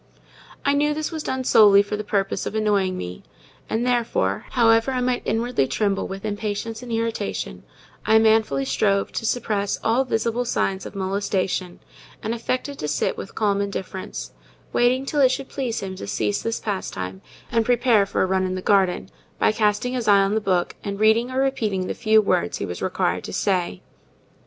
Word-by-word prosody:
I 280 Hz, -, +4 dB
knew 295 Hz, +1 st, +2 dB
this 310 Hz, +2 st, -3 dB
was 320 Hz, -1 st, -4 dB
done 260 Hz, -3 st, -2 dB
solely 205 Hz, -4 st, +6 dB
for 205 Hz, +1 st, -4 dB
the 210 Hz, -, -4 dB
purpose 200 Hz, -2 st, -1 dB
of -, -, -5 dB
annoying 200 Hz, -4 st, +1 dB
me; 90 Hz, 0 st, -6 dB, 0.5 s
and, 225 Hz, +2 st, 0 dB
therefore, 230 Hz, -, 0 dB
however 230 Hz, 0 st, +4 dB
I 255 Hz, -, -1 dB
might 250 Hz, 0 st, 0 dB
inwardly 230 Hz, -, 0 dB
tremble 200 Hz, +2 st, 0 dB
with 195 Hz, +2 st, -7 dB
impatience 215 Hz, +1 st, -3 dB
and 245 Hz, -1 st, -8 dB
irritation, 225 Hz, -2 st, -2 dB, 0.4 s
I 220 Hz, 0 st, +5 dB
manfully 220 Hz, -11 st, +3 dB
strove 195 Hz, +9 st, +1 dB
to 225 Hz, -, -3 dB
suppress 210 Hz, -4 st, -1 dB
all 235 Hz, +4 st, +3 dB
visible 230 Hz, -1 st, -1 dB
signs 195 Hz, -5 st, -1 dB
of -, -, -12 dB
molestation, 190 Hz, -2 st, -2 dB, 0.4 s
and 220 Hz, -, -1 dB
affected 255 Hz, +4 st, -3 dB
to 150 Hz, -, -3 dB
sit 150 Hz, -, 0 dB
with -, -, -8 dB
calm 200 Hz, -2 st, +1 dB
indifference, 190 Hz, -, -5 dB, 0.4 s
waiting 250 Hz, +2 st, +2 dB
till 290 Hz, +1 st, 0 dB
it 260 Hz, -, +6 dB
should 265 Hz, +1 st, -3 dB
please 245 Hz, -5 st, -3 dB
him 190 Hz, -1 st, -5 dB
to 100 Hz, -, -7 dB
cease 105 Hz, 0 st, -1 dB
this 230 Hz, 0 st, -2 dB
pastime, 95 Hz, -, -4 dB, 0.3 s
and 230 Hz, -1 st, +2 dB
prepare 235 Hz, -3 st, +3 dB
for -, -, 0 dB
a -, -, +3 dB
run 190 Hz, 0 st, +1 dB
in 185 Hz, 0 st, -2 dB
the 185 Hz, -, -4 dB
garden, 190 Hz, -3 st, +2 dB, 0.3 s
by -, -, +3 dB
casting 215 Hz, +3 st, +1 dB
his 245 Hz, -3 st, -2 dB
eye 200 Hz, -1 st, +6 dB
on 195 Hz, +1 st, 0 dB
the 220 Hz, -, +1 dB
book 185 Hz, -3 st, 0 dB
and 200 Hz, 0 st, -4 dB
reading 220 Hz, +3 st, +4 dB
or 260 Hz, 0 st, -2 dB
repeating 220 Hz, -9 st, 0 dB
the -, -, -3 dB
few 220 Hz, -2 st, +3 dB
words 85 Hz, -, 0 dB
he -, -, -3 dB
was 90 Hz, -2 st, -6 dB
required -, -, 0 dB
to -, -, -7 dB
say. 180 Hz, -, -1 dB
215 Hz, 190 wpm, -23 LUFS, 195-235 Hz, 0.5 s, solely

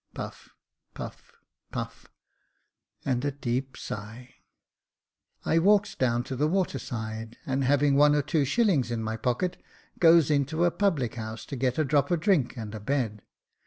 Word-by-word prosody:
[Puff, -, -, -7 dB, 0.5 s
puff, -, -, -8 dB, 0.4 s
puff, -, -, -6 dB, 1.0 s
and 125 Hz, -2 st, 0 dB
a 145 Hz, -, 0 dB
deep 130 Hz, -1 st, -3 dB
sigh.] 110 Hz, +5 st, -7 dB, 1.1 s
I 165 Hz, -, +3 dB
walks 200 Hz, +2 st, +4 dB
down 120 Hz, -2 st, +1 dB
to 130 Hz, -, -5 dB
the 145 Hz, +4 st, +1 dB
water 180 Hz, -5 st, 0 dB
side, 110 Hz, -1 st, -6 dB
and 135 Hz, 0 st, 0 dB
having 140 Hz, +1 st, +3 dB
one 145 Hz, +1 st, +6 dB
or 145 Hz, -, +2 dB
two 145 Hz, +1 st, +1 dB
shillings 150 Hz, -, +2 dB
in 115 Hz, -2 st, -2 dB
my 110 Hz, 0 st, -2 dB
pocket, 125 Hz, +11 st, -1 dB, 0.4 s
goes 165 Hz, -3 st, +6 dB
into 155 Hz, +4 st, +2 dB
a 175 Hz, -, +3 dB
public 160 Hz, -, 0 dB
house 110 Hz, -1 st, -6 dB
to 140 Hz, -, -6 dB
get 130 Hz, -1 st, 0 dB
a 155 Hz, -, +2 dB
drop 140 Hz, 0 st, +2 dB
of 175 Hz, -, +1 dB
drink 155 Hz, -, +2 dB
and 110 Hz, -2 st, -6 dB
a 110 Hz, -, -5 dB
bed. 110 Hz, -2 st, -1 dB
135 Hz, 160 wpm, -27 LUFS, 120-155 Hz, 1.1 s, one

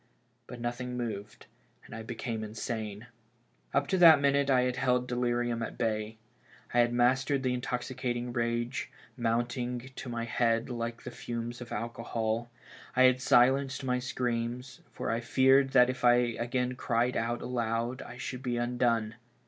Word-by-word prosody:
But 125 Hz, -, -9 dB
nothing 125 Hz, +1 st, -3 dB
moved, 110 Hz, -4 st, -5 dB, 0.4 s
and -, -, -12 dB
I 115 Hz, -, -6 dB
became 115 Hz, 0 st, -4 dB
insane. 110 Hz, 0 st, -5 dB, 0.7 s
Up 140 Hz, -, +2 dB
to 190 Hz, -, +1 dB
that 165 Hz, -4 st, +9 dB
minute 140 Hz, 0 st, +2 dB
I 130 Hz, -2 st, +5 dB
had 125 Hz, 0 st, 0 dB
held 125 Hz, -1 st, +1 dB
delirium 120 Hz, -1 st, 0 dB
at 115 Hz, -, -5 dB
bay. 110 Hz, -1 st, -2 dB, 0.6 s
I 120 Hz, -, +3 dB
had 120 Hz, 0 st, +4 dB
mastered 130 Hz, +3 st, +2 dB
tlie 130 Hz, -1 st, +1 dB
intoxicating 125 Hz, -1 st, -3 dB
rage, 120 Hz, +1 st, -1 dB, 0.3 s
mounting 120 Hz, +1 st, -2 dB
to 125 Hz, -, -7 dB
my 115 Hz, -1 st, -3 dB
head 115 Hz, +1 st, +1 dB
like 115 Hz, -1 st, -4 dB
the -, -, -6 dB
fames 120 Hz, +1 st, -5 dB
of 120 Hz, -, -8 dB
alcohol; 115 Hz, 0 st, -2 dB, 0.5 s
I 130 Hz, -, +5 dB
had 130 Hz, 0 st, +5 dB
silenced 130 Hz, +3 st, +3 dB
my 125 Hz, -1 st, 0 dB
screams, 125 Hz, 0 st, -3 dB
for -, -, -3 dB
I 115 Hz, -, 0 dB
feared 130 Hz, +3 st, +4 dB
that 125 Hz, -2 st, +7 dB
if 130 Hz, 0 st, -4 dB
I 120 Hz, 0 st, +7 dB
again 125 Hz, +1 st, 0 dB
cried 120 Hz, 0 st, 0 dB
out 120 Hz, +1 st, -1 dB
aload 120 Hz, 0 st, -2 dB
I 120 Hz, -, -9 dB
should 130 Hz, -1 st, -5 dB
be 125 Hz, -2 st, -2 dB
undone. 120 Hz, -2 st, +1 dB
120 Hz, 155 wpm, -30 LUFS, 115-125 Hz, 0.7 s, that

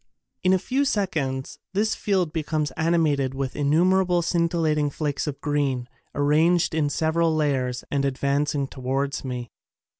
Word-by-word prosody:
In 185 Hz, -, +4 dB
a 190 Hz, -, +5 dB
few 260 Hz, +9 st, 0 dB
seconds 160 Hz, -, -2 dB, 0.2 s
this 215 Hz, +2 st, +2 dB
field 185 Hz, -6 st, 0 dB
becomes 155 Hz, -2 st, -1 dB
ani 165 Hz, +2 st, +1 dB
mated 140 Hz, -5 st, +1 dB
with 135 Hz, -1 st, -3 dB
innumerable 175 Hz, +4 st, +3 dB
scintillating 165 Hz, -3 st, +1 dB
flakes 145 Hz, +1 st, -2 dB
of 140 Hz, -2 st, -4 dB
green, 140 Hz, -4 st, 0 dB, 0.3 s
arranged 160 Hz, +5 st, +3 dB
in 155 Hz, -2 st, +1 dB
several 160 Hz, +2 st, +1 dB
layers 130 Hz, -5 st, 0 dB
and 140 Hz, -1 st, +1 dB
advancing 140 Hz, +1 st, 0 dB
towards 135 Hz, +1 st, -2 dB
me. 125 Hz, -3 st, -5 dB
150 Hz, 140 wpm, -24 LUFS, 140-170 Hz, 0.3 s, a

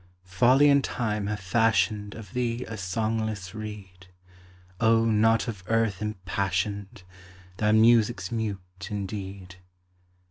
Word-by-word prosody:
Folly 125 Hz, +10 st, +4 dB
and 140 Hz, -1 st, +5 dB
Time 105 Hz, -4 st, -2 dB
have 105 Hz, 0 st, -3 dB
fashioned 105 Hz, +1 st, +1 dB
Of 105 Hz, -4 st, -11 dB
thee 120 Hz, 0 st, -2 dB
a 115 Hz, -, -6 dB
songless 110 Hz, 0 st, -2 dB
reed; 100 Hz, -4 st, -9 dB, 0.7 s
O 115 Hz, 0 st, +4 dB
not 115 Hz, +1 st, +3 dB
of 105 Hz, -6 st, -6 dB
earth 115 Hz, -4 st, +1 dB
impassioned! 100 Hz, +1 st, -3 dB, 0.5 s
Thy 105 Hz, +1 st, +2 dB
music's 110 Hz, -3 st, +4 dB
mute 100 Hz, -4 st, -5 dB
indeed. 95 Hz, -2 st, -6 dB
105 Hz, 110 wpm, -26 LUFS, 95-115 Hz, 0.7 s, and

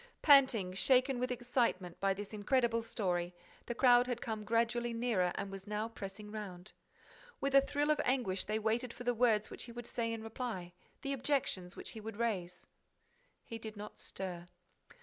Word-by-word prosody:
Panting, 260 Hz, -10 st, +6 dB
shaken 255 Hz, +5 st, +3 dB
with 250 Hz, +1 st, 0 dB
excitement 240 Hz, -8 st, 0 dB
by 195 Hz, 0 st, +2 dB
this 205 Hz, +2 st, -7 dB
incredible 230 Hz, +2 st, +2 dB
story, 180 Hz, -6 st, -2 dB, 0.3 s
the 240 Hz, -, -3 dB
crowd 245 Hz, -1 st, +6 dB
had 245 Hz, -2 st, -2 dB
come 220 Hz, -2 st, -4 dB
gradually 235 Hz, +2 st, +1 dB
nearer 230 Hz, -7 st, +1 dB
and 200 Hz, -1 st, -4 dB
was 195 Hz, +1 st, -8 dB
now 210 Hz, +1 st, -1 dB
pressing 210 Hz, -1 st, -8 dB
round. 195 Hz, -3 st, -7 dB, 0.7 s
With 275 Hz, 0 st, -1 dB
a 275 Hz, -, +8 dB
thrill 290 Hz, +2 st, +1 dB
of 305 Hz, -, +2 dB
anguish, 245 Hz, -8 st, +1 dB
they 215 Hz, +2 st, 0 dB
waited 225 Hz, +3 st, 0 dB
for -, -, -8 dB
the 245 Hz, 0 st, +2 dB
words 220 Hz, -3 st, +2 dB
which -, -, -5 dB
he 240 Hz, -, -10 dB
would 240 Hz, 0 st, -7 dB
say 230 Hz, -1 st, -2 dB
in 225 Hz, -1 st, -4 dB
reply, 225 Hz, -6 st, -5 dB, 0.3 s
the 275 Hz, 0 st, -1 dB
objections 250 Hz, -9 st, 0 dB
which -, -, -5 dB
he 220 Hz, -, -8 dB
would 220 Hz, -1 st, -7 dB
raise. 185 Hz, -7 st, -2 dB, 0.8 s
He 230 Hz, -, -6 dB
did 220 Hz, -1 st, -7 dB
not 210 Hz, +1 st, -8 dB
stir. 180 Hz, -2 st, -6 dB
225 Hz, 180 wpm, -34 LUFS, 195-245 Hz, 0.8 s, a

